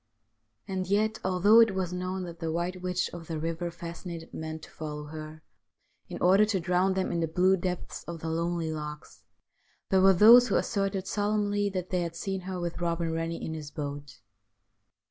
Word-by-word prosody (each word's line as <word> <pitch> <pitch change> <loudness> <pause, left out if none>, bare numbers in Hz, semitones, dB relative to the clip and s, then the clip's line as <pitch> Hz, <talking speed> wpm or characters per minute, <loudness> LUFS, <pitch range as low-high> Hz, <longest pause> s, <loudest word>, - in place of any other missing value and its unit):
And 185 -1 -3
yet, 215 +3 +1
although 190 +4 +5
it 225 -4 +5
was 185 -2 -2
known 185 +1 -3
that 170 -1 -8
the 165 -1 -2
White 175 +2 -2
Witch 180 0 -1
of 170 -2 -8
the 165 - -3
Eiver 165 +2 -3
fascinated 170 0 -8
men 160 0 -5
to - - -13
follow 150 -1 -6
her 155 +1 -9 0.7
in - - -5
order 190 +4 +5
to 210 -2 +1
drown 180 +2 +1
them 190 -1 0
in 170 - -1
the 165 - 0
blue 185 +4 +3
depths 180 -1 -4
of 170 -1 -6
the 160 - -4
lonely 165 0 -1
lochs, 150 -1 -7 0.7
there 190 -1 +5
were 195 0 +7
those 235 +6 +8
who - - 0
asserted 195 -2 0
solemnly 205 0 0
that 185 -2 -4
they 180 -1 +1
had 170 -1 -4
seen 190 +2 -3
her 185 -1 -3
with 170 -1 -3
Eobin 170 -1 -1
Rennie 165 +1 -3
in 160 - -4
his 155 -2 -6
boat. 145 -4 -7
175 Hz, 190 wpm, -28 LUFS, 165-190 Hz, 0.7 s, those